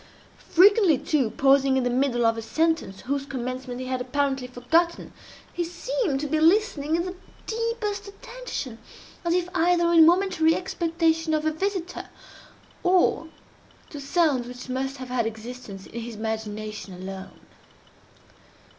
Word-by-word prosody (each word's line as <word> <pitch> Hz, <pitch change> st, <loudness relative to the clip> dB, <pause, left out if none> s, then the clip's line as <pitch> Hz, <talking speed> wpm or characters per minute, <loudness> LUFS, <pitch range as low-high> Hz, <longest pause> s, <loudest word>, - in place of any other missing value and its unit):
Frequently, 380 Hz, -3 st, +6 dB
too, 270 Hz, -6 st, 0 dB
pausing 270 Hz, +1 st, +3 dB
in 260 Hz, -, +1 dB
the 245 Hz, -, 0 dB
middle 245 Hz, -2 st, +1 dB
of 225 Hz, 0 st, +3 dB
a 225 Hz, -, -4 dB
sentence 315 Hz, -6 st, -1 dB
whose 280 Hz, +2 st, -2 dB
commencement 255 Hz, -1 st, -5 dB
he 255 Hz, -, -4 dB
had 255 Hz, 0 st, -2 dB
apparently 270 Hz, 0 st, -1 dB
forgotten, 320 Hz, +8 st, 0 dB, 0.4 s
he 350 Hz, -, -1 dB
seemed 350 Hz, -, -2 dB
to -, -, -2 dB
be 310 Hz, +2 st, 0 dB
listening 325 Hz, -3 st, +3 dB
in 340 Hz, +1 st, 0 dB
the 365 Hz, -, -4 dB, 0.3 s
deepest 440 Hz, -3 st, -2 dB
attention, 400 Hz, -, -7 dB, 0.4 s
as 340 Hz, 0 st, +1 dB
if 360 Hz, -1 st, 0 dB
either 345 Hz, 0 st, +3 dB
in 330 Hz, -1 st, +8 dB
momentary 345 Hz, -3 st, +3 dB
expectation 330 Hz, -3 st, 0 dB
of 310 Hz, 0 st, -1 dB
a 315 Hz, -, +2 dB
visitor, 365 Hz, +2 st, -3 dB, 0.7 s
or 360 Hz, -3 st, +3 dB, 0.6 s
to 290 Hz, -, -7 dB
sounds 280 Hz, -4 st, +1 dB
which 250 Hz, +1 st, -9 dB
must 265 Hz, +2 st, -2 dB
have 255 Hz, -1 st, -8 dB
had 245 Hz, -3 st, 0 dB
existence 225 Hz, -3 st, -8 dB
in 235 Hz, -, -7 dB
his 230 Hz, 0 st, -7 dB
imagination 215 Hz, -2 st, -5 dB
alone. 190 Hz, +1 st, -8 dB
285 Hz, 145 wpm, -25 LUFS, 245-345 Hz, 0.7 s, in